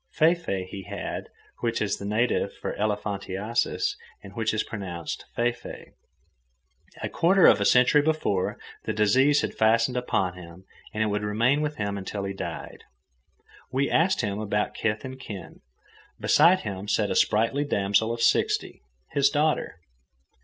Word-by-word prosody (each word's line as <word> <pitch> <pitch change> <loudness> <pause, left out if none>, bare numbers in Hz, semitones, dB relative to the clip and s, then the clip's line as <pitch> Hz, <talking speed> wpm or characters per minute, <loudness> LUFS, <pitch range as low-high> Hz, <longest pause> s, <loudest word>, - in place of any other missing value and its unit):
Fee 160 +2 +5
fee 100 - -4
he 95 0 -8
had, - - -5 0.3
which 115 -1 -1
is 105 - -1
the 100 - -6
native 110 +4 0
for - - -4
elephantiasis 105 - -1 0.3
and - - -11
which 110 -1 0
is 110 - 0
pronounced 90 -6 -6
fay 120 +1 +2
fay. 120 - -11 1.1
A - - 0
quarter 185 +2 +4
of - - +6
a - - +2
century 125 +6 +5
before, 145 -12 0 0.3
the - - -1
disease 130 +8 +4
had - - -3
fastened 115 +3 +2
upon 95 -7 0
him, 90 0 -12 0.3
and 110 - 0
it - - +1
would 105 -1 -1
remain 115 +8 +1
with 150 0 -2
him 100 -1 -3
until 100 +1 -5
he 100 0 -3
died. 95 - -7 0.9
We 135 +2 0
asked 180 +4 +3
him 100 -1 -2
about 105 -1 -1
kith 105 +1 -2
and 130 0 -7
kin. 100 -8 -9 0.6
Beside 170 +5 +5
him 100 -1 -5
sat 105 0 +1
a - - 0
sprightly 115 +7 +2
damsel 100 -3 +1
of 115 0 -2
sixty, - - +1 0.3
his 140 -1 +3
daughter. 150 - 0
110 Hz, 160 wpm, -26 LUFS, 100-135 Hz, 1.1 s, of